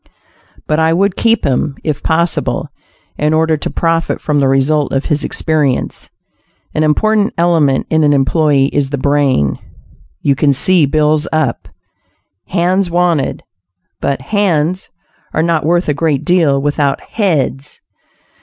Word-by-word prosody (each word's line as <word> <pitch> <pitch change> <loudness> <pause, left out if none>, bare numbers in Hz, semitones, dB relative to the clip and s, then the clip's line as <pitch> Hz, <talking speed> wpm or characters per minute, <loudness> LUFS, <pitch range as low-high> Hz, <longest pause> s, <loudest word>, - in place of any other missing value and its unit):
But 155 +1 0
I 160 0 +2
would 195 +2 +1
keep 230 0 +1
him, 140 +1 0
if 150 -2 -2
possible, 165 +1 -1 0.5
in 150 +1 +1
order 160 0 +2
to - - -4
profit 165 0 -1
from 150 -1 0
the 135 - +2
result 135 +2 +1
of 135 +1 -1
his 150 -3 -1
experience. 150 -5 -1 0.6
An 155 - -1
important 210 +7 +1
element 165 -6 +2
in 160 -1 +3
an 145 - +3
employee 140 0 +2
is 140 -2 0
the 140 - -3
brain. 140 - +1 0.6
You 140 - +3
can 140 0 +2
see 165 +3 +3
bills 155 +1 +1
up, 155 -7 -1 0.8
"Hands 185 +1 0
Wanted," 170 -5 0 0.6
but 135 -2 -2
"hands" 185 0 -1 0.5
are 160 - +2
not 165 -2 0
worth 175 +2 +1
a 150 - +1
great 145 -2 -1
deal 165 -7 +2
without 145 0 0
"heads." 150 - -2
155 Hz, 140 wpm, -14 LUFS, 140-170 Hz, 0.8 s, in